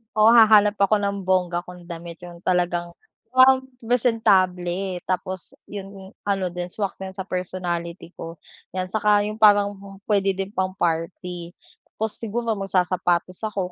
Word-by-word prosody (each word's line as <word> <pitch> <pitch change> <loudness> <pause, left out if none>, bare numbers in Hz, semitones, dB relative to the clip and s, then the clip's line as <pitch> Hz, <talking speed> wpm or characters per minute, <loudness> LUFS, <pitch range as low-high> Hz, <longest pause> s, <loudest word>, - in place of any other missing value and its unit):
Oo, 215 0 +5
hahanap 215 -2 +7
ako 205 +1 +3
ng 200 -1 -2
bongga 180 -2 +1
kong 180 -1 -12
damit, 170 -1 -8
yung 175 0 -12
talagang, 175 -1 0 0.4
wow 260 +1 +6 0.2
presentable 190 -6 +1
tapos 185 0 -3 0.2
yung 195 -1 -8 0.2
ano 195 -3 0
din 175 0 -4
swak 195 +2 -4
din 190 0 -7
sa 190 - -4
personality 175 -2 -4
ko, 165 0 -7 0.4
yan. 185 -1 -3
Saka 210 -1 +3
yung 215 +1 -5
parang 205 -2 +6 0.3
puwede 195 -2 +1
din 195 +1 -4
pang-party 175 -2 -3 0.4
tapos 220 -1 -3
siguro 230 +1 -2
magsasapatos 180 -2 0
ako 195 -4 -3
190 Hz, 135 wpm, -23 LUFS, 180-205 Hz, 0.4 s, hahanap